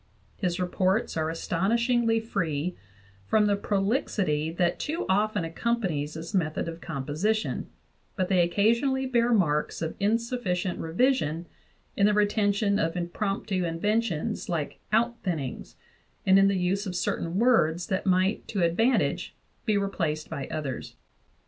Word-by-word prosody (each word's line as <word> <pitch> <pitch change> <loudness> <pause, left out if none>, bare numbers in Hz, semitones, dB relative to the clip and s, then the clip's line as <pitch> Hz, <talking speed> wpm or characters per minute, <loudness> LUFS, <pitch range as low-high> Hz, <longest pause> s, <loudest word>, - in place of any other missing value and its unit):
His 180 -3 -2
reports 185 +4 0
are 160 -1 0
astonish 190 +8 0
ingly 235 -2 +3
free 175 -6 -2 0.5
from 215 -1 +4
the 205 -1 +3
prolixity 195 - 0
that 175 +1 0
too 320 +3 -2
often 205 -1 +1
accompanies 165 -5 -1
this 165 +4 -7
method 165 -4 0
of 165 0 -6
composition; 165 +9 -1 0.5
but 185 -2 0
they 185 -2 +3
occasionally 235 +9 +2
bear 240 -2 +2
marks 150 -9 +1
of 160 -1 -3
insufficient 210 -4 0
revision 170 - +1 0.5
in 200 - +4
the 210 - +3
retention 205 0 +2
of 165 -3 0
impromptu 190 +2 -2
inventions 210 +4 -1
like 160 -4 -2
"outthinnings" 210 - -1 0.5
and 190 0 +6
in 195 - +6
the 200 -1 +2
use 190 +3 0
of 180 - -4
certain 170 0 -1
words 190 -8 +3
that 190 +1 -2
might 185 +3 +2
to 195 -5 -1
advantage 225 +10 +1 0.3
be 215 -3 +2
replaced 165 -6 -2
by 140 - -4
others. 150 -5 -5
190 Hz, 135 wpm, -27 LUFS, 165-215 Hz, 0.5 s, and